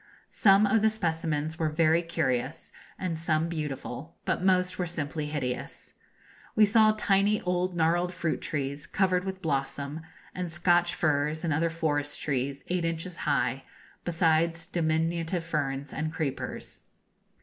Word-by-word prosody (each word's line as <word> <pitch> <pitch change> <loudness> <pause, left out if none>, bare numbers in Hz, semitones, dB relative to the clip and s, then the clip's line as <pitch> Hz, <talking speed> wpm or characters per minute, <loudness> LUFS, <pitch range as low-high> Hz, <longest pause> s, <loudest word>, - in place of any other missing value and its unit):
Some 200 0 +5
of 215 +1 +3
the 220 - +5
specimens 160 -6 -1
were 160 -2 +1
very 160 +1 +3
curious 135 -4 -2 0.3
and 170 -4 -2
some 160 0 +1
beautiful, 150 -2 -5
but - - 0
most 185 -1 +2
were 180 - 0
simply 155 -2 -3
hideous. 135 -5 -4 0.6
We 215 - +7
saw 215 +1 +5
tiny 205 +1 +3
old 180 0 -1
gnarled 175 +2 +2
fruit 170 -3 -2
trees, 145 +1 -3
covered 185 -2 +1
with 190 -1 -5
blossom, 140 0 -2 0.3
and 180 -2 -4
Scotch 175 +1 +3
firs 150 0 +1
and 165 -3 +1
other 165 +3 +1
forest 145 -3 -1
trees, 140 -1 -2
eight 180 -1 0
inches 165 +1 -2
high, - - +1 0.4
besides 165 -1 +1
diminutive 165 +1 0
ferns 140 -3 -2
and 155 +1 -2
creepers. 150 -4 -4
165 Hz, 140 wpm, -28 LUFS, 150-180 Hz, 0.6 s, We